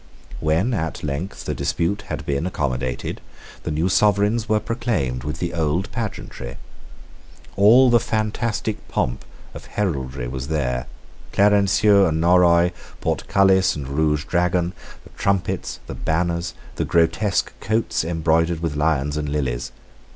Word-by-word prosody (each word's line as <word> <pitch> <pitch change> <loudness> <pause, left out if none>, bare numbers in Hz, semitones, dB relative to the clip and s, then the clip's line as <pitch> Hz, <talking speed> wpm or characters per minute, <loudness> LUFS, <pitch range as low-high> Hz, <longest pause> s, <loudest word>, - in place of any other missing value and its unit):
When 80 +10 +1
at 80 -7 -3
length 75 +6 -4
the - - -1
dispute 85 +4 -1
had - - -5
been 70 +4 -1
accommodated, 65 -7 -3 0.4
the - - -4
new 80 +3 0
sovereigns 105 +3 +2
were 110 0 +3
proclaimed 105 - -2
with 75 +2 -4
the 85 0 -3
old 85 +3 0
pageantry. 105 - -5 1.0
All 120 +6 +6
the 120 - +6
fantastic 110 0 -2
pomp - - -2 0.3
of - - -10
heraldry 70 -10 -2
was 65 +2 -5
there, 65 -5 -1 0.5
Clarencieux 100 0 +4
and 80 -1 0
Norroy, 85 0 +5 0.3
Portcullis 95 -1 +2
and 70 -3 -5
Rouge 75 +1 +1
Dragon, 90 0 +1 0.3
the - - -16
trumpets, 100 -2 -1
the - - -6
banners, 85 +1 -1 0.2
the - - 0
grotesque 85 +4 +1
coats 110 -3 0
embroidered 80 0 +1
with 80 -3 -2
lions 75 -1 +1
and 75 -1 -2
lilies. 65 -4 -2
85 Hz, 130 wpm, -22 LUFS, 75-100 Hz, 1.0 s, All